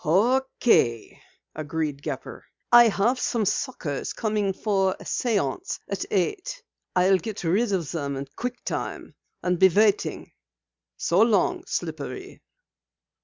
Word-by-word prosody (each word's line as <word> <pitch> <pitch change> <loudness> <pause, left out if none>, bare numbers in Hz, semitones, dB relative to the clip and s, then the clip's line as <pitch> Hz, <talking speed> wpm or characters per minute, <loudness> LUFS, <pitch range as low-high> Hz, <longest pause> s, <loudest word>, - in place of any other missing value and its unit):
"Okay," 215 - +2 0.3
agreed 150 -2 -3
Gepper. 145 -3 -6 0.3
"I 240 -1 +9
have 225 +4 +1
some 230 -3 0
suckers 175 - -2
coming 210 -3 0
for 195 -1 +1
a - - -10
séance 200 - -1
at 200 -1 -3
eight. 410 - -2 0.3
I'll 185 +1 +4
get 215 -3 -6
rid 200 +7 +1
of 175 -6 -1
them 140 -4 -3
in 135 +1 -4
quick 245 0 -5
time, - - -4 0.3
and 180 -1 0
be 190 - +7
waiting. 205 +3 +1 0.7
So 175 +4 +2
long, 240 - +2
Slippery." - - -5
195 Hz, 120 wpm, -25 LUFS, 165-235 Hz, 0.7 s, I